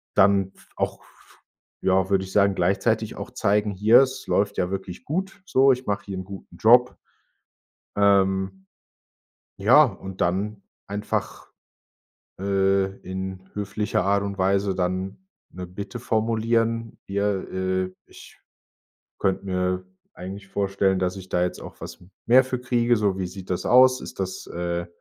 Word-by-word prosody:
dann 95 -1 +4
f - - -21
auch, - - -2
f - - -24 0.4
ja, 95 0 +2
würde 95 -1 +3
ich 95 - -9
sagen, 100 -1 +4
gleichzeitig 90 +3 0
auch - - -7
zeigen 105 +1 +1
„Hier 110 +6 +6
es 130 -1 -2
läuft 100 0 +1
ja 90 - 0
wirklich 95 -2 -6
gut 190 +6 -3
so. 135 -6 +4
Ich 130 -1 -2
mache 100 -1 -2
hier 95 -2 -5
'n - - -5
guten 95 -2 -11
Job.” 125 +3 +5 1.0
Ähm, 95 -1 +2 0.9
ja, 120 +10 +7
und 95 -4 -7
dann 100 +4 -1 0.3
einfach, 105 +1 -4 0.9
äh, 95 0 +1
in 95 0 -6
höflicher 105 +1 -1
Art 100 +1 +2
und 100 -1 -4
Weise 95 +1 +1
dann 95 - -3 0.2
'ne 90 0 -7
Bitte 100 +5 -7
formulieren: 115 0 0
„Hier, 100 0 -1
äh, 95 0 -1
ich - - -15 0.8
könnte 95 0 0
mir 90 0 -1 0.3
eigentlich 95 +2 -8
vorstellen, 95 -1 0
dass 90 0 -1
ich 95 0 -10
da 90 - +1
jetzt 90 - -3
auch - - -11
was - - -9 0.2
mehr 130 +3 +6
für 125 -1 -3
kriege, 120 -1 +2
so 100 -3 +1
wie 90 - -2
sieht 95 +1 -10
das 90 - -2
aus? 130 +1 +6
Ist - - -9
das, 95 0 -4
äh 85 0 -3
100 Hz, 150 wpm, -24 LUFS, 95-110 Hz, 1.0 s, ja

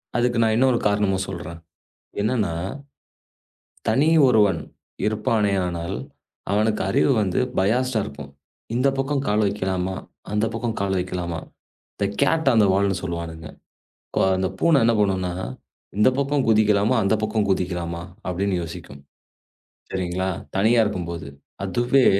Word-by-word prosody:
அதுக்கு 120 0 +1
நான் 110 0 +2
இன்னொரு 130 -1 +4
காரணமும் 100 -2 +1
சொல்றேன். 85 -2 -7 0.6
என்னன்னா 110 -6 0 1.4
தனி 135 +8 +3 0.2
ஒருவன் 105 -7 +4 0.5
இருப்பானே 105 -1 +1
ஆனாலும், 85 +2 -4 0.5
அவனுக்கு 105 0 +1
அறிவு 140 - +3
வந்து 95 +3 0 0.2
பயாஸ்ட்டா 115 +4 +2
இருக்கும். 70 0 -9 0.4
இந்தப் 135 +2 +2
பக்கம் 135 0 0
கால் 105 +1 +2
வெக்கலாமா? 95 -2 -1 0.4
அந்தப் 110 +2 0
பக்கம் 115 -1 -2
கால் 95 -1 0
வெக்கலாமா? 90 -2 -3 0.6
தே 100 - +2 0.2
கேட் 160 0 +3
ஆன் 110 -2 +5
தே - - +5
வால்ன்னு 100 -2 +1
சொல்லுவானுங்க. 85 -2 -5 0.7
ஓ! - - +3 0.2
அந்தப் 95 0 -2
பூனை 165 -4 +5
என்ன 115 0 +4
பண்ணும்னா? 95 -3 +1 0.6
இந்தப் 125 +5 +4
பக்கம் 140 -1 +1
குதிக்கலாமா? 105 +1 +4
அந்தப் 105 +2 +1
பக்கம் 110 -1 0
குதிக்கலாமா 90 -2 -2 0.3
அப்படின்னு 95 +2 -1
யோசிக்கும். 80 -4 -9 0.9
சரிங்களா? 95 0 -1 0.3
தனியா 115 +4 +4
இருக்கும்போது 85 -6 -4 0.4
அதுவே 120 +6 +2
100 Hz, 125 wpm, -23 LUFS, 90-115 Hz, 1.4 s, ஆன்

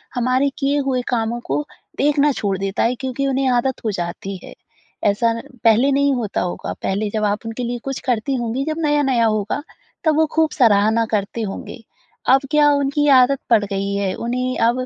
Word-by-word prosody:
हमारे 255 +3 +2
किए 280 +1 +1
हुए 255 -2 +1
कामों 235 -1 -1
को 295 - -1 0.3
देखना 295 0 +3
छोड़ 200 -7 -2
देता 195 +1 -1
है 235 +2 +1
क्योंकि 265 +1 -2
उन्हें 270 0 0
आदत 250 +1 0
हो 215 - +1
जाती 180 +1 -5
है। - - -10 0.5
ऐसा 220 +3 +2 0.3
पहले 235 +4 +4
नहीं 280 0 +2
होता 225 -5 -2
होगा, 175 - -4
पहले 205 +2 -2
जब 215 +1 -2
आप 210 +2 -1
उनके 225 +2 -4
लिए 240 0 -3
कुछ 270 -1 -4
करती 250 +1 0
होंगी 240 +2 -2
जब 310 0 -3
नया-नया 275 -5 +2
होगा 215 +5 -1 0.4
तब 315 -2 +3
वो 320 - +4
खूब 320 -1 +2
सराहना 220 -2 +3
करते 210 +2 -1
होंगे। 220 +3 -6 0.5
अब 265 +1 +6
क्या 300 -1 +5
उनकी 285 +1 +1
आदत 270 +2 +2
पड़ 225 -3 +4
गई 200 0 -3
है 200 -2 -1
उन्हें 250 +2 -2
अब 255 +2 0
245 Hz, 185 wpm, -20 LUFS, 215-275 Hz, 0.5 s, अब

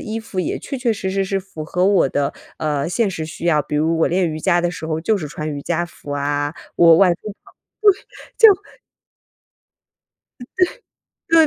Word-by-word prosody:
衣 220 +1 -4
服 210 -4 -4
也 - - -2
确 275 - -6
确 245 -3 +1
实 200 -3 -4
实 195 0 0
是 195 +1 -1
符 185 -5 -8
合 180 +4 0
我 200 -8 +4
的， 140 +1 -1 0.2
呃， 150 -2 -1
现 215 +4 +1
实 160 -4 -4
需 160 +2 -6
要。 150 -4 +3
比 150 - -4
如 160 +2 +1
我 - - +3
练 180 0 +1
瑜 155 0 -5
伽 175 0 +2
的 175 - 0
时 170 -2 -6
候 160 0 -2
就 215 +6 +1
是 155 -6 -5
穿 150 +1 -5
瑜 145 -1 -5
伽 175 0 -1
服 145 -3 -12
啊， 145 +1 -1 0.2
我 165 -1 +7
外 185 +1 +5
出 - - -20 0.2
跑 - - -19 1.1
步 - - -33
就 - - -20 1.6
嗯， 245 - -9 0.8
对， 325 -1 +6
170 Hz, 215 characters per minute, -20 LUFS, 155-195 Hz, 1.6 s, 我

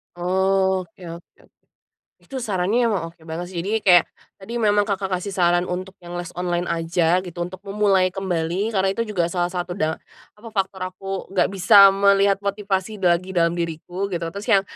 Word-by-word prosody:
Oke 190 0 0
oke. 170 +1 -12 0.8
Itu 270 - -7
sarannya 215 +2 +1
emang 200 -7 -1
oke 170 - -32
banget 170 +2 -5
sih, 175 - -4
jadi 220 +2 0
kayak, 175 -3 +7 0.4
tadi 195 +4 -9
memang 205 -1 +3
Kakak 195 -2 -2
kasih 200 +2 -6
saran 175 -1 +2
untuk 185 +2 -5
yang 175 0 -9
les 175 -1 -6
online 175 -1 -1
aja 165 +1 +1
gitu, 175 -1 -7
untuk 185 +2 -9
memulai 195 -2 +2
kembali, 185 +1 -1
karena 190 -1 +2
itu 230 - -1
juga 180 -5 0
salah 175 0 0
satu 175 0 -3
da 160 -4 -1 0.4
apa 220 +2 -12
faktor 190 -1 -2
aku 195 +1 -6
nggak 190 - +2
bisa 195 +1 +7
melihat 200 0 +3
motivasi 200 0 -3
bagi 180 +1 +1
dalam 170 -1 +3
diriku, 170 +3 -3
gitu 170 - -2
terus 200 +4 -7
yang, 200 -5 +5
190 Hz, 175 wpm, -22 LUFS, 175-200 Hz, 0.8 s, kayak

